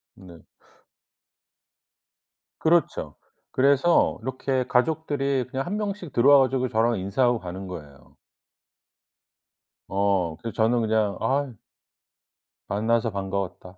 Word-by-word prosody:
네. 85 -5 -15 2.2
그렇죠. 165 +1 +1 0.4
그래서 140 +6 +3
이렇게 130 +1 -2
가족들이 140 -1 0
그냥 135 +1 -3
1 205 +4 -3
명씩 200 -6 -4
들어와 140 +4 +6
가지고 130 0 0
저랑 115 -2 +1
인사하고 120 +5 +1
가는 95 +1 -7
거예요. 75 -6 -11 1.7
어. 95 -4 0
그래서 115 - -6
저는 115 +2 +2
그냥 110 -2 0
"아" 135 -1 0 1.1
"만나서 115 +3 0
반가웠다." 95 -2 -5
120 Hz, 220 characters per minute, -25 LUFS, 100-135 Hz, 2.2 s, 들어와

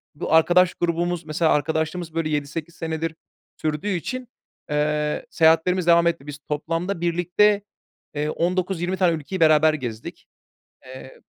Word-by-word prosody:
Bu 145 - -3
arkadaş 175 +2 +5
grubumuz, 175 0 -1
mesela 160 +1 +1
arkadaşlığımız 160 +2 -1
böyle 165 -1 -1
7-8 150 +3 -4
senedir 160 0 -3 0.4
sürdüğü 155 +4 -3
için, 250 +8 -3 0.4
eee, 150 0 -1
seyahatlerimiz 165 +2 +3
devam 170 0 +5
etti. 165 -4 -2
Biz 145 -1 -6
toplamda 165 +5 -2
birlikte, 175 +4 +2 0.5
eee, 150 +1 -1
19-20 180 +2 -1
tane 180 -3 +3
ülkeyi 160 +5 -6
beraber 155 -1 +5
gezdik. 120 -7 -7 0.6
Eee 130 0 -12
165 Hz, 125 wpm, -23 LUFS, 150-175 Hz, 0.6 s, arkadaş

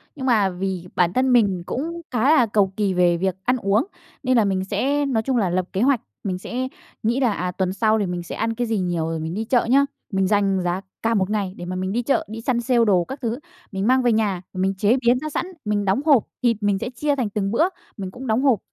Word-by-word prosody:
Nhưng 265 -3 -5
mà 215 -6 +3
vì 185 -1 -4
bản 175 -1 +2
thân 255 +2 +2
mình 200 -7 +3
cũng 330 - -4
khá 240 -3 0
là 250 - +5
cầu 205 -3 +1
kỳ 205 -3 +1
về 175 -1 +3
việc 190 +1 -1
ăn 250 +5 +2
uống, 205 -1 +1 0.4
nên 255 -1 +3
là 220 - +4
mình 190 -1 0
sẽ 270 +9 0
nói 240 -5 0
chung 260 +1 0
là 200 -6 +1
lập 180 +1 0
kế 190 - 0
hoạch, 265 -1 +3 0.2
mình 185 -2 -2
sẽ 250 +7 -4 0.4
nghĩ 235 +4 +1
là, 245 -5 +2
à, 180 -1 -2
tuần 185 0 -1
sau 220 +2 +2
thì 205 - 0
mình 175 -1 -3
sẽ - - -7
ăn 225 0 -1
cái 240 +1 -1
gì 225 -1 0
nhiều 175 -3 -1
rồi 165 0 -3
mình 160 +1 -4
đi 220 +4 -3
chợ 245 +1 +2
nhá. 275 +4 +4 0.3
Mình 190 -1 +1
dành 195 -2 +2
giá 180 +1 -1 0.2
cả 230 0 +2
1 190 -3 +1
ngày 205 -3 -1
để 175 - -7
mà 180 +1 -4
mình 185 +1 -2
đi 235 +4 0
chợ, 275 - +1
đi 225 +1 -6
sale 240 -1 +2
đồ 185 -4 +4
các 265 +7 -7
thứ, 235 0 -2 0.3
mình 195 +1 -2
mang 260 +1 +4
về 240 - +3
nhà 210 -5 +1
mình 190 +1 0
chế 210 +5 +3
biến 245 +1 +5
ra 310 +3 -4
sẵn, 325 - -2 0.2
mình 210 -1 0
đóng 195 +7 +1
hộp. 280 -8 +5 0.2
Thịt 235 -3 +3
mình 205 -1 +1
sẽ 245 - -3
chia 285 +4 -1
thành 250 -6 -1
từng 200 -1 -2
bữa 230 +8 +3 0.3
mình 190 -2 -5
cũng 255 +5 -8
đóng 225 +2 +2
hộp, 260 -8 +4
210 Hz, 265 wpm, -22 LUFS, 190-245 Hz, 0.4 s, là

